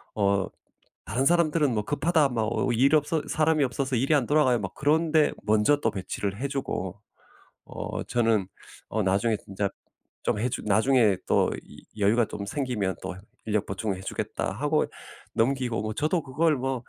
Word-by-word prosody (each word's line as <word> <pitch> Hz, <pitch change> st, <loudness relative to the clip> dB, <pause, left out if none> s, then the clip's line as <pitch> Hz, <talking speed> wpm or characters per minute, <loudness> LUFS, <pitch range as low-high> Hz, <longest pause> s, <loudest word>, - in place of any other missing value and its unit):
어 100 Hz, -2 st, +2 dB, 0.7 s
다른 130 Hz, +3 st, +1 dB
사람들은 155 Hz, -5 st, +3 dB
뭐 105 Hz, -, -1 dB
"급하다." 150 Hz, +3 st, +2 dB
막 115 Hz, -3 st, 0 dB
어 130 Hz, -, 0 dB
일 130 Hz, +6 st, +4 dB
없어 155 Hz, +2 st, +1 dB
"사람이 155 Hz, -1 st, +2 dB
없어서 130 Hz, 0 st, -1 dB
일이 135 Hz, +6 st, +2 dB
안 140 Hz, -5 st, +2 dB
돌아가요." 130 Hz, -5 st, +3 dB
막 95 Hz, -2 st, -5 dB
그런 155 Hz, +3 st, +2 dB
데 155 Hz, -2 st, +4 dB
먼저 110 Hz, +7 st, +3 dB
또 -, -, +1 dB
배치를 100 Hz, 0 st, -4 dB
해주고 135 Hz, -9 st, -3 dB, 0.7 s
어 -, -, -5 dB
저는 115 Hz, -5 st, +1 dB, 0.4 s
어 110 Hz, -, -1 dB
나중에 100 Hz, +4 st, +2 dB
진짜 100 Hz, 0 st, -3 dB, 0.5 s
좀 -, -, 0 dB
해주 120 Hz, +2 st, -2 dB
나중에 110 Hz, -1 st, +4 dB
또 -, -, +3 dB
이 -, -, -15 dB, 0.2 s
"여유가 110 Hz, +4 st, +4 dB
좀 100 Hz, -1 st, -6 dB
생기면 105 Hz, -, -2 dB
또 -, -, -4 dB, 0.3 s
인력 105 Hz, -2 st, 0 dB
보충을 100 Hz, 0 st, -3 dB
해주겠다." 95 Hz, -, -3 dB
하고 -, -, +1 dB, 0.5 s
넘기고 120 Hz, -2 st, 0 dB
뭐 110 Hz, 0 st, -3 dB
저도 155 Hz, -, 0 dB
그걸 150 Hz, +3 st, +1 dB
뭐 130 Hz, -1 st, -2 dB
120 Hz, 310 characters per minute, -26 LUFS, 105-145 Hz, 0.7 s, 일